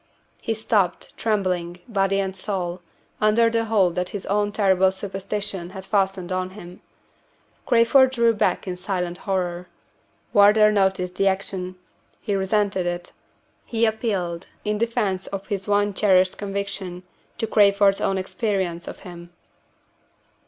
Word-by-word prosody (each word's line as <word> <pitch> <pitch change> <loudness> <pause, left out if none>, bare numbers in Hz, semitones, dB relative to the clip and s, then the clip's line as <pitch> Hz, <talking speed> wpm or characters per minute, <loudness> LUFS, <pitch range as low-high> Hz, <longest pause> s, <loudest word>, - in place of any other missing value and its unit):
He 225 - -2
stopped, 205 -5 0
trembling, 180 -5 -1
body 195 -3 +1
and 190 -1 -2
soul, 185 -3 -3 0.4
under 225 +2 +4
the 230 0 +1
hold 200 -6 +2
that 180 +1 -2
his 200 -2 -6
own 205 +1 0
terrible 190 -2 +3
superstition 195 -1 -4
had 190 - -8
fastened 195 -3 0
on 185 0 -1
him. 180 -2 -11 0.9
Crayford 250 +2 +5
drew 235 -3 +3
back 195 -3 0
in 180 - -2
silent 180 -2 -3
horror. 180 -2 -1 0.7
Wardour 210 +1 +6
noticed 190 -3 0
the 195 - +2
action 190 -1 -2 0.4
he 210 - -3
resented 195 -1 0
it 175 0 -4 0.5
he 230 0 0
appealed, 195 -6 -2 0.2
in 210 0 -1
defense 205 -5 -1
of 195 0 -5
his 200 -2 -4
one 205 0 +2
cherished 185 -2 +3
conviction, 195 -2 -4 0.3
to - - -1
Crayford's 200 -2 +4
own 195 - +1
experience 190 -3 -2
of - - -8
him. 175 -1 -10
195 Hz, 135 wpm, -23 LUFS, 185-210 Hz, 0.9 s, Wardour